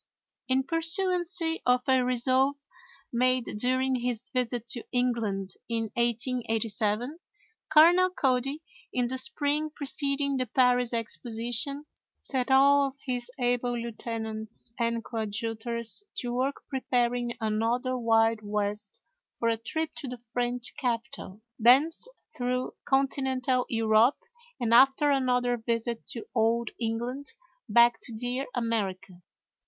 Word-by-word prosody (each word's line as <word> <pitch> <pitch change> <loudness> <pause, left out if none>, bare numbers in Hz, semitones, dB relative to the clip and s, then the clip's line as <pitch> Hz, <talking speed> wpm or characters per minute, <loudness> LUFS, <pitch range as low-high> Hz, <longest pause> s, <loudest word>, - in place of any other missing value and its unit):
In 260 +1 +2
pursuance 345 +3 0 0.2
of 250 0 +3
a 260 -1 +4
resolve 255 +3 +2 0.6
made 255 +1 +2 0.2
during 255 +2 +2
his 245 0 -3
visit 245 -3 -1
to 240 - 0
England 230 -6 -1 0.2
in 225 -2 -2
1887, 235 +1 -1 0.5
Colonel 345 +4 +7
Cody, 275 -2 0 0.3
in 250 -1 0
the 260 +1 +1
spring 290 +3 +1
preceding 280 -1 -1
the 255 -1 -1
Paris 250 0 +3
Exposition, 240 +5 -2 0.3
set 260 -1 -2
all 280 +1 +5
of 270 - -8
his 250 -2 -2
able 245 -1 0
lieutenants 225 0 -5
and 230 -1 -1
coadjutors 225 - -3
to 245 -1 -3
work 260 +3 -1
preparing 245 -2 -1
another 230 +4 0
Wild 225 -2 +3
West 205 -1 -3 0.3
for 230 - +1
a 230 - +2
trip 315 +8 -3
to 275 - -5
the 250 0 -6 0.2
French 245 0 -2
capital, 235 -4 -4 0.2
thence 270 - +4 0.3
through 250 0 -2
Continental 265 -2 +1
Europe, 225 +2 +3 0.4
and, 235 -1 +1
after 270 +4 +6
another 250 -2 +1
visit 230 0 -2
to 230 - -6
Old 230 0 +1
England, 240 +5 -3 0.4
back 235 0 +5
to - - -8
dear 245 +4 -2
America. 195 -6 -2
245 Hz, 115 wpm, -28 LUFS, 230-265 Hz, 0.6 s, Colonel